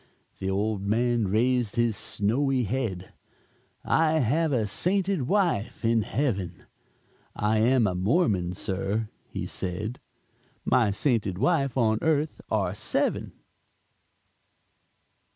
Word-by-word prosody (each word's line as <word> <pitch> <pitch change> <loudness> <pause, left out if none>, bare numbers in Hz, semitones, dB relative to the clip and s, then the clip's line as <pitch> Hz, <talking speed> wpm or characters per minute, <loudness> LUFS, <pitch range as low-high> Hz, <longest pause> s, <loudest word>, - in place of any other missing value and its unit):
The 95 - -2
old 100 +1 -1
man 115 +2 +1
raised 120 +2 +1
his 120 -2 +1
snowy 125 +7 0
head, 105 -6 -3 0.7
"I 160 -1 +3
have 155 +4 +1
a 120 -5 +1
sainted 180 - 0
wife 170 - 0
in 115 0 +3
Heaven; 100 - -2 0.7
I 105 +1 +1
am 120 +1 +4
a 95 - +1
Mormon, 95 - +1
sir," 100 +3 -2 0.2
he - - -5
said, 105 +7 -4 0.7
"My 120 -5 +3
sainted 105 -3 0
wife 140 - +1
on 110 -3 +2
earth 155 -1 0
are - - 0
seven." - - -1
115 Hz, 110 wpm, -27 LUFS, 100-135 Hz, 0.7 s, am